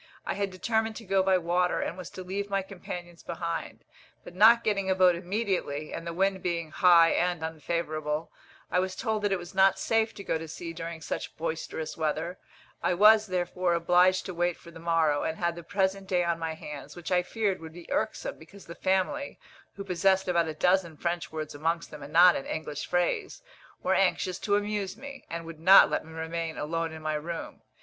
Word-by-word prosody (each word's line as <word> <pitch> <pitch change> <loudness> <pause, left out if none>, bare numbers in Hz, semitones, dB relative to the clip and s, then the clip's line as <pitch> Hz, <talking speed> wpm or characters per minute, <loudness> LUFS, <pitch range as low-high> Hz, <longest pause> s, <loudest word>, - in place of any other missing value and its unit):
I - - -1
had 200 0 -1
determined 220 +4 -1
to 225 - -9
go 195 0 +2
by 190 0 +3
water, 180 +1 +1
and - - -2
was 180 -2 -8
to 185 - -5
leave 200 +2 -4
my 195 -1 0
companions 175 -3 -8
behind; 170 -1 -5 0.4
but - - -11
not 225 +5 +6
getting 200 -3 0
a 190 - +3
boat 185 -1 +5
immediately, 175 -5 -2
and 165 - -6
the - - -2
wind 190 +1 +1
being 170 -3 -2
high 170 0 +6
and 175 -2 0
unfavourable, 155 -1 -3 0.4
I 180 - +3
was 185 0 -2
told 220 -3 -1
that 205 -1 0
it 195 - +2
was 175 +1 -10
not 190 0 +4
safe 225 0 +1
to 200 - -8
go 160 - -1
to 160 - -7
sea 165 +2 -7
during 165 0 -6
such - - -5
boisterous 160 -1 -4
weather; 160 +3 -2 0.4
I 180 - +1
was, 215 +3 +6
therefore, 180 -1 0
obliged 180 +2 +3
to 185 - -5
wait 175 0 0
for 170 - -14
the 165 - -12
morrow, 165 -3 +2
and 160 - -2
had 170 -1 -1
the 170 - -7
present 190 +2 -1
day 180 -1 +2
on 170 -1 0
my 160 -1 -3
hands, 145 -2 -9
which 175 0 -7
I 180 -1 +4
feared 195 -1 -2
would 160 0 -9
be 175 0 -11
irksome, - - -2
because 200 -1 -14
the 170 - -8
family, 190 +12 -1 0.4
who 200 - -6
possessed 190 0 +2
about 170 -2 +2
a 155 - -4
dozen 180 -1 +2
French 170 +2 -2
words 155 -1 -5
amongst 165 +3 -2
them 150 - -9
and 140 +1 -9
not 175 +2 +7
an 135 - -4
English 150 -2 -4
phrase, 385 - -1 0.4
were - - +2
anxious 185 0 +1
to 205 - +1
amuse 205 -1 -2
me, 275 +1 -10
and 165 0 -5
would 165 -1 -9
not 185 +4 +8
let - - 0
me 160 - -13
remain 160 0 -4
alone 165 +2 -2
in 160 0 -9
my 155 0 -1
room. 160 +3 -5
175 Hz, 210 wpm, -28 LUFS, 165-195 Hz, 0.4 s, not